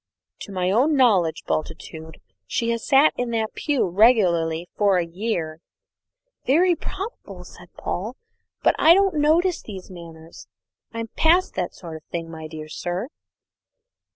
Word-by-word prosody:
"To - - -9
my 185 -1 0
own 270 +9 +3
knowledge, 200 - +3
Bultitude, 160 0 -5 0.3
she 235 0 -1
has 230 -1 -3
sat 280 +2 +5
in 245 -1 -2
that 220 -1 -2
pew 285 -9 0
regularly 175 -5 +3
for 200 -3 +3
a 175 - 0
year." 170 -3 -3 0.9
"Very 345 +6 +4
probably," 330 - -7
said 180 -1 -15
Paul, 215 +8 -4 0.5
"but - - +5
I 330 +2 +7
don't 390 -1 +3
notice 330 +3 +2
these 190 -3 -10
matters. 170 - -12 0.4
I'm 230 0 -5
past 345 +8 +2
that 180 -2 -3
sort 165 -3 -8
of 155 - -16
thing, 165 -1 -6
my 160 -1 -8
dear 155 -1 -8
sir." 175 - -4
195 Hz, 145 wpm, -23 LUFS, 170-270 Hz, 0.9 s, I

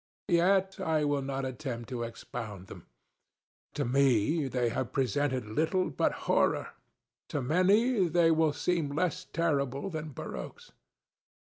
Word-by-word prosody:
Yet 190 +3 +3
I 160 -5 +1
will 145 -1 +1
not 135 0 -3
attempt 125 -2 -5
to 125 -2 -4
expound 115 -4 -6
them. - - -12 0.9
To 145 - -1
me, 135 +3 +2
they 125 -2 0
have 125 +2 -3
presented 130 -1 0
little 160 - 0
but - - +1
horrorŌĆöto 140 -4 -2
many 195 - +3
they 170 -1 +4
will 160 -1 +3
seem 160 +1 -1
less 180 +2 -1
terrible 140 0 -1
than 155 -1 -4
barroques. - - -8
145 Hz, 125 wpm, -30 LUFS, 130-170 Hz, 0.9 s, they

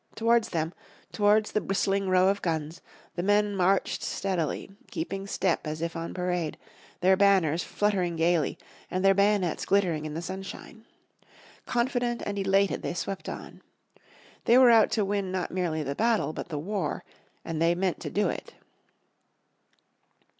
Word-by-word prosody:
Towards 230 0 +2
them, 165 0 -2 0.4
towards 210 +1 +3
the 215 - 0
bristling 195 0 0
row 185 +1 +4
of 200 +1 0
guns, 160 -1 -3 0.3
the 175 - -3
men 205 +2 +2
marched 190 +1 +1
steadily, 185 -2 -2 0.2
keeping 195 - -4
step 185 -5 0
as 155 +1 -4
if 170 +1 -3
on 165 0 -4
parade, 180 -3 -2 0.4
their 190 +1 +5
banners 185 -5 +3
fluttering 190 -5 0
gaily, 165 -2 +1 0.3
and 185 +1 -1
their 195 - +7
bayonets 200 -3 +2
glittering 175 -6 +1
in 155 0 -5
the 165 - -3
sunshine. 195 +4 -8 0.8
Confident 240 -1 0
and 200 0 -3
elated 195 0 +2
they - - -3
swept 195 +2 -4
on. - - -8 0.8
They 235 - +6
were 255 -2 +8
out 225 -2 +6
to 215 -3 +1
win 200 -1 -1
not 185 -1 -2
merely 170 -4 -1
the 140 0 -3
battle 220 -3 +1
but - - -6
the 155 - -3
war, 180 +1 -3 0.4
and 165 -1 -3
they 170 +1 +3
meant 185 0 -1
to - - -5
do 210 - +1
it. - - -5
190 Hz, 155 wpm, -27 LUFS, 170-205 Hz, 0.8 s, were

